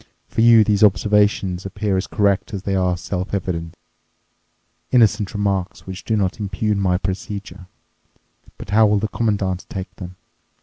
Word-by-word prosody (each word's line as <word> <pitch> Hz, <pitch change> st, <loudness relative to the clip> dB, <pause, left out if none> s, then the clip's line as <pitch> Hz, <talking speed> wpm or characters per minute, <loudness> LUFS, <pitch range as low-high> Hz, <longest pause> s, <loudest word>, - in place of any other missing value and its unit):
For -, -, -1 dB
you 115 Hz, -1 st, +7 dB
these 105 Hz, 0 st, +2 dB
observations 100 Hz, -2 st, +2 dB
appear 100 Hz, +1 st, -2 dB
as 95 Hz, -, -1 dB
correct 100 Hz, +2 st, 0 dB
as 95 Hz, -, -6 dB
they 100 Hz, -, -2 dB
are 90 Hz, -1 st, +1 dB
self 90 Hz, +2 st, -4 dB
evident—innocent 95 Hz, +5 st, -3 dB
remarks 100 Hz, -2 st, -2 dB
which 95 Hz, 0 st, -8 dB
do 110 Hz, -, 0 dB
not 95 Hz, +1 st, -1 dB
impugn 105 Hz, 0 st, -1 dB
my 90 Hz, -2 st, +2 dB
procedure. 95 Hz, 0 st, -6 dB, 0.9 s
But -, -, -9 dB
how 110 Hz, +1 st, +5 dB
will 105 Hz, 0 st, +2 dB
the 110 Hz, +2 st, -1 dB
Commandant 100 Hz, -6 st, -1 dB
take 95 Hz, -1 st, -6 dB
them? 90 Hz, -1 st, -8 dB
100 Hz, 145 wpm, -20 LUFS, 95-105 Hz, 0.9 s, you